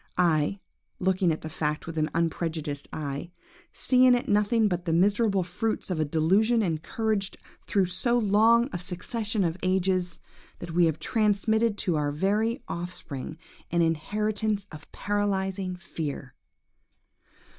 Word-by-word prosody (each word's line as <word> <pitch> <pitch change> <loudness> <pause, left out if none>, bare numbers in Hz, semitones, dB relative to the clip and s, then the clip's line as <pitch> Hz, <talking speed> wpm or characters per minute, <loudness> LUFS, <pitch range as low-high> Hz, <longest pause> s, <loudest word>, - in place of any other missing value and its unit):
I, 170 +1 +2 0.4
looking 185 -1 +2
at 160 - -3
the - - -6
fact 150 0 -2
with 165 - -7
an 155 0 0
unprejudiced 160 -3 -2
eye, 145 +2 -4 0.4
see 255 -1 +4
in 250 - +7
it 245 - -2
nothing 210 +2 +3
but 180 -3 -2
the 165 - 0
miserable 200 +2 +3
fruits 190 +4 -2
of 170 - -1
a 155 - +2
delusion 195 +10 +2
encouraged 195 +5 -1 0.3
through 195 -2 +2
so 240 +7 0
long 225 +2 +4
a 175 - -2
succession 205 +4 -2
of 170 0 -1
ages, 185 -1 0 0.4
that 175 - -7
we 175 +1 +4
have 160 -2 +1
transmitted 220 +1 +1
to 175 -6 0
our 145 -1 0
very 210 - 0
offspring 165 -4 -6 0.3
an 170 0 +2
inheritance 210 +5 -1
of 155 -1 -12
paralysing 195 -2 -1
fear! 155 -7 -6
185 Hz, 140 wpm, -27 LUFS, 165-210 Hz, 0.4 s, in